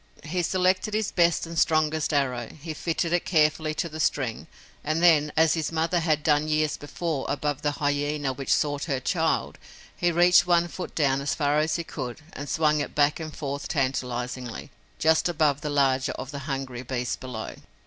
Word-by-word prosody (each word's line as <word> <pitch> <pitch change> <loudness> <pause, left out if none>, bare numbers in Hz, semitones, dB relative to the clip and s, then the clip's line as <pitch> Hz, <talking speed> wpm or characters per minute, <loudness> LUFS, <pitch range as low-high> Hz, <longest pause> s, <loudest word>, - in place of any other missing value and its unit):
He 175 +3 -2
selected 185 +4 +1
his 215 -1 0
best 170 -2 +2
and 165 -1 -3
strongest 155 -1 +2
arrow, 125 -5 0
he 160 +2 -6
fitted 165 +2 -2
it 175 - +2
carefully 155 -2 +2
to 170 - -1
the 155 -1 -8
string 135 -6 -1 0.4
and 155 +3 -1
then, 150 -4 +5
as 160 -1 +5
his 160 -1 -2
mother 165 +2 +1
had 155 -3 +1
done 150 0 +2
years 155 -1 +1
before 145 0 -4
above 145 -1 -2
the 145 -1 0
hyena 145 -1 -1
which 135 +1 -4
sought 145 -1 +1
her 135 -5 -1
child, 160 +4 -1 0.4
he 175 0 +1
reached 175 +1 +5
one 175 -1 +3
foot 180 +1 -7
down 140 -3 +2
as 140 - -1
far 145 -1 +1
as 155 +1 +1
he 170 - -2
could, 130 -5 -6
and 145 +1 -7
swung 150 -1 +2
it 145 - -4
back 145 +1 +3
and 155 -2 -7
forth 140 -1 -4
tantalizingly, 125 -3 -3 0.3
just 160 +2 +3
above 150 -4 +1
the 150 - -3
larger 135 -2 +2
of 135 - -7
the 140 - -5
hungry 135 -3 -4
beasts 125 -1 -2
below. 125 -4 -6
150 Hz, 190 wpm, -26 LUFS, 140-165 Hz, 0.4 s, then